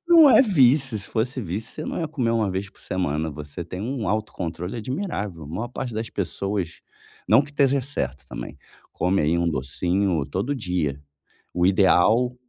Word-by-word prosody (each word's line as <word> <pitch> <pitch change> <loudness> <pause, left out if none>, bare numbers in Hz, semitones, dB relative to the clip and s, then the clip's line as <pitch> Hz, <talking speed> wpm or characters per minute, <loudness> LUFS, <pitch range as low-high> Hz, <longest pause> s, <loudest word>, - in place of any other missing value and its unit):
Não 330 -4 +8
é - - +8
vício, 135 - +4
se 95 - -8
fosse 125 +4 -1
vício 100 +3 -4
você 155 - -6
não - - -3
ia 160 - -2
comer 130 -7 -1
uma 115 -2 +2
1 95 - -2 0.2
por - - -21
semana, 80 -3 -1
você 75 +3 -7
tem 90 +2 -7
um 120 +2 -3
autocontrole 95 -2 -3
admirável. 105 - -4
A - - -9
maior 105 +10 -4
parte 125 -1 -5
das 110 +1 -3
pessoas, 95 -2 -3 0.5
não 140 - +6
que 140 - -10
esteja 140 -2 +2
certo 70 - -4
também, - - -7 0.4
come 95 +2 +1
aí 80 +3 +2
um 85 0 +1
docinho 85 +4 0
todo 100 - -2
dia. 90 - -2 0.5
O 90 0 +2
ideal 105 +6 +4
100 Hz, 180 wpm, -24 LUFS, 85-125 Hz, 0.5 s, Não